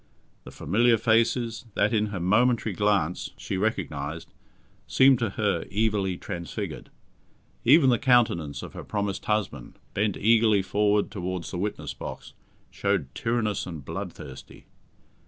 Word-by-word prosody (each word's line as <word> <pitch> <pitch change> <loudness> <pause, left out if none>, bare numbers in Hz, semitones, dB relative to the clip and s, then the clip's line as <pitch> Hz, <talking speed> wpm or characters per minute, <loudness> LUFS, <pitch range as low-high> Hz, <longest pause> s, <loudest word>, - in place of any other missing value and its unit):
The - - -9
familiar 115 +8 +2
faces, 115 +1 +1
that 105 +3 +2
in 110 -1 +2
her 100 -3 -5
momentary 110 +4 +2
glance, 95 -4 0
she - - -4
recognized, 80 -7 -3 0.5
seemed 130 -1 +5
to 115 - 0
her 100 -6 0
evilly 100 -3 0
transfigured. 85 0 -6 0.8
Even 135 0 +6
the 120 - +2
countenance 85 - +2
of - - -9
her - - -7
promised 100 -1 -3
husband, 100 - -2 0.2
bent 105 -1 0
eagerly 110 -2 +4
forward 105 +2 +1
towards 90 -2 -4
the 90 - -4
witness 105 +2 -3
box, - - -8 0.4
showed 100 -9 -1
tyrannous 115 -5 -1
and 80 -6 -8
bloodthirsty. 65 0 -8
105 Hz, 130 wpm, -26 LUFS, 90-115 Hz, 0.8 s, Even